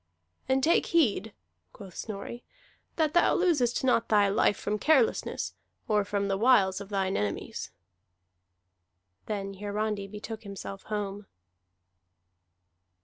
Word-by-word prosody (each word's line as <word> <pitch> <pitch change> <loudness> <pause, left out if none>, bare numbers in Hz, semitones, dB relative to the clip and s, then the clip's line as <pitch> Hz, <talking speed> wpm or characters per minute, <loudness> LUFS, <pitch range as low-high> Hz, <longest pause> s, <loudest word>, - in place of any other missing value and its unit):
"And 265 0 +2
take 335 - +3
heed," 225 - +2 0.4
quoth 195 -3 -11
Snorri, 220 +3 -6 0.5
"that 310 -2 +1
thou 345 - +4
losest 290 -11 +2
not 250 -3 +2
thy 205 -2 +4
life 200 +1 +2
from 210 +1 -2
carelessness, 320 - +2 0.3
or 210 -3 +2
from 200 0 -1
the 195 -1 -1
wiles 205 -6 +4
of 200 - -9
thine 195 -2 0
enemies." 105 -1 -3 1.6
Then 195 -2 -3
Hiarandi 205 0 -2
betook 215 +2 -7
himself 195 -1 -7
home. 205 -1 -4
210 Hz, 115 wpm, -29 LUFS, 200-240 Hz, 1.6 s, thou